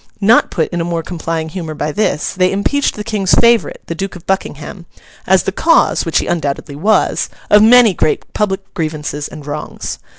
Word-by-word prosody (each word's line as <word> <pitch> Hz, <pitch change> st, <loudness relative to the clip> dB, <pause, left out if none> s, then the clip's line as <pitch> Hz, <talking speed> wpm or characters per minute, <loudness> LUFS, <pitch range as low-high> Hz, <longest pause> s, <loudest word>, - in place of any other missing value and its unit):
Not 215 Hz, +3 st, +4 dB
put 160 Hz, -, -1 dB
in 175 Hz, -1 st, -2 dB
a -, -, 0 dB
more 170 Hz, -1 st, -2 dB
complying 165 Hz, -2 st, -4 dB
humour 160 Hz, -2 st, -6 dB
by 150 Hz, +1 st, -2 dB
this, 160 Hz, -3 st, -1 dB
they 185 Hz, -1 st, +2 dB
impeached 280 Hz, +9 st, 0 dB
the 210 Hz, -, -5 dB
King's 205 Hz, -4 st, +1 dB
favourite, 235 Hz, -1 st, +2 dB
the -, -, -4 dB
Duke 195 Hz, +4 st, -5 dB
of 175 Hz, -, -12 dB
Buckingham, 175 Hz, -1 st, -4 dB, 0.4 s
as 190 Hz, -1 st, +4 dB
the -, -, -1 dB
cause 330 Hz, -, +2 dB
(which 165 Hz, -, +1 dB
he -, -, +1 dB
undoubtedly 145 Hz, -4 st, -3 dB
was) 205 Hz, +9 st, +1 dB, 0.2 s
of 210 Hz, -, +7 dB
many 230 Hz, -1 st, +6 dB
great 155 Hz, -, 0 dB
public 195 Hz, -2 st, -2 dB
grievances 150 Hz, -2 st, -4 dB
and 150 Hz, -, -11 dB
wrongs. 150 Hz, +1 st, -6 dB
180 Hz, 190 wpm, -15 LUFS, 160-205 Hz, 0.4 s, of